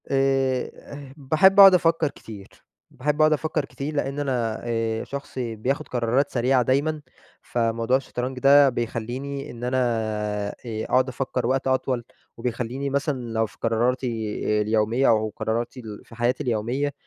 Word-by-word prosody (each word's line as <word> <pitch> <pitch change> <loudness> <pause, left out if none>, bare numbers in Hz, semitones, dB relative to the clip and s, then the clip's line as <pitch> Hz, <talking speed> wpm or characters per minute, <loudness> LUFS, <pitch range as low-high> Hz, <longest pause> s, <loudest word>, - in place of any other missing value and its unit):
آآ 135 -1 +2 0.3
ه 140 -2 -10
باحب 155 +8 +4
اقعد 195 -1 +11
افكّر 165 -3 +3
كتير، 100 -3 -11 0.4
باحب 150 +4 -1
اقعد 155 0 +5
افكّر 155 -1 -1
كتير 145 +2 -6
لإن 140 0 -2
أنا 120 -6 -1
آآ 115 -1 -1
شخص 140 0 -7
بياخد 120 +3 -2
قرارات 125 +3 0
سريعة 125 +1 +2
دايمًا، 145 +5 0 0.4
فموضوع 115 +1 0
الشطرنج 130 -1 -5
ده 140 +1 +6
بيخلّيني 125 +4 -4
إن 120 0 -10
أنا 125 +1 0 0.9
آآ 110 -2 -4
أقعد 130 +1 +2
افكّر 125 -1 -2
وقت 135 +1 0
أطول، 130 -2 0 0.3
وبيخلّيني 125 +3 -3
مثلًا 135 -4 -2
لو 110 0 +1
في 105 - -14
قراراتي 120 +3 +1 0.5
اليومية 110 +4 +1
أو 110 -1 +2
قراراتي 115 +4 -3
ال 110 -4 -9
في 115 - -14
حياتي 120 +2 0
اليومية 125 +5 -1
130 Hz, 145 wpm, -24 LUFS, 115-140 Hz, 0.9 s, اقعد